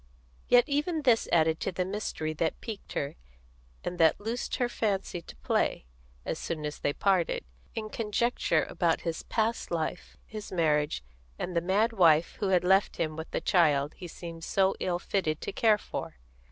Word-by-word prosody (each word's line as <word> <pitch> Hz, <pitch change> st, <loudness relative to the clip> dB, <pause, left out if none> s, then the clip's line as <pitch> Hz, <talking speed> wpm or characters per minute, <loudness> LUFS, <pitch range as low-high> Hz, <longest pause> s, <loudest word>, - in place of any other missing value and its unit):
Yet 245 Hz, 0 st, +7 dB
even 300 Hz, +3 st, 0 dB
this 240 Hz, -4 st, +3 dB
added 160 Hz, -1 st, +3 dB
to -, -, -2 dB
the 180 Hz, 0 st, -1 dB
mystery 185 Hz, -5 st, -3 dB
that 160 Hz, +1 st, -1 dB
piqued 220 Hz, -4 st, -7 dB
her, 140 Hz, -, -3 dB, 0.7 s
and 175 Hz, -, -4 dB
that 160 Hz, -1 st, +5 dB
loosed 225 Hz, +4 st, -3 dB
her 245 Hz, -, +1 dB
fancy 200 Hz, -6 st, -1 dB
to -, -, -12 dB
play, -, -, 0 dB, 0.4 s
as -, -, -3 dB
soon 155 Hz, -3 st, -3 dB
as 150 Hz, -, -4 dB
they 145 Hz, -, +1 dB
parted, 185 Hz, +1 st, +1 dB, 0.3 s
in 215 Hz, -1 st, -4 dB
conjecture 220 Hz, -6 st, +1 dB
about 170 Hz, -1 st, +1 dB
his 165 Hz, -1 st, -3 dB
past 225 Hz, +1 st, -1 dB
life, 170 Hz, +1 st, -3 dB
his 215 Hz, -1 st, -8 dB
marriage, 150 Hz, -, +1 dB, 0.3 s
and 175 Hz, -, -4 dB
the 170 Hz, -, +3 dB
mad 205 Hz, +6 st, +2 dB
wife 165 Hz, -5 st, +4 dB
who 205 Hz, -, 0 dB
had 185 Hz, -2 st, +3 dB
left 190 Hz, +2 st, +3 dB
him 155 Hz, -1 st, -1 dB
with 160 Hz, +1 st, -6 dB
the -, -, -2 dB
child 150 Hz, -5 st, +3 dB
he 180 Hz, -, -9 dB
seemed 165 Hz, 0 st, -8 dB
so 195 Hz, +2 st, +2 dB
ill 175 Hz, -1 st, 0 dB
fitted 175 Hz, -4 st, -1 dB
to -, -, -3 dB
care 220 Hz, -2 st, +4 dB
for. -, -, -6 dB
180 Hz, 180 wpm, -29 LUFS, 160-215 Hz, 0.7 s, Yet